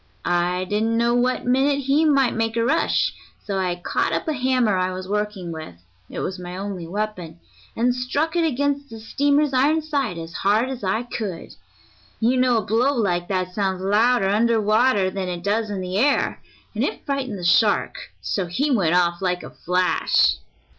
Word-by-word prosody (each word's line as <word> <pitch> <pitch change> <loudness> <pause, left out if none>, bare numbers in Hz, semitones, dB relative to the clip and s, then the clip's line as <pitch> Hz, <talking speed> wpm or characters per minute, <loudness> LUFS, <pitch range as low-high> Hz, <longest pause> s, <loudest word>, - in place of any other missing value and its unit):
I 175 +1 +1
didn't 215 +4 0
know 235 +1 +2
what 245 +1 +1
minute 275 +3 +2
he 280 +4 +2
might 275 -4 +3
make 225 0 -1
a 230 - +2
rush, 295 +6 +1 0.3
so 195 -2 -2
I 180 -2 0
caught 175 - -1
up - - -2
a 315 - +1
hammer 255 -5 +1
I 185 0 0
was 185 0 -6
working 210 -3 -3
with 155 - -8 0.3
it - - -5
was 185 0 -4
my 180 0 -7
only 190 -3 -5
weapon 180 -4 -4 0.4
and 245 +2 +2
struck 285 +6 -2
it 340 - +2
against 285 -1 -1
the 225 - -9
steamer's 285 +5 +1
iron 295 +5 +2
side 280 - -2
as 165 0 -7
hard 215 +6 +2
as 255 -4 -6
I 195 +5 0
could. 210 -8 -6 0.7
You 235 +3 +2
know 250 -2 +3
a 220 - -1
blow 240 +7 +2
like 175 -7 0
that 185 -2 -2
sounds 190 -2 -1
louder 210 +2 +3
under 225 +3 +2
water 215 -2 +2
than 185 -1 -3
it 175 -1 -5
does 210 +2 0
in 200 -2 -3
the 185 +2 -2
air, 280 +4 +1 0.3
and - - -1
it - - -3
frightened 270 -7 -2
the 180 - -8
shark 205 +5 +2
so 190 -3 -2
he 280 - -1
went 180 -9 +2
off 175 0 +2
like 180 -1 -1
a - - -9
flash." 180 +1 +2
215 Hz, 190 wpm, -22 LUFS, 185-255 Hz, 0.7 s, might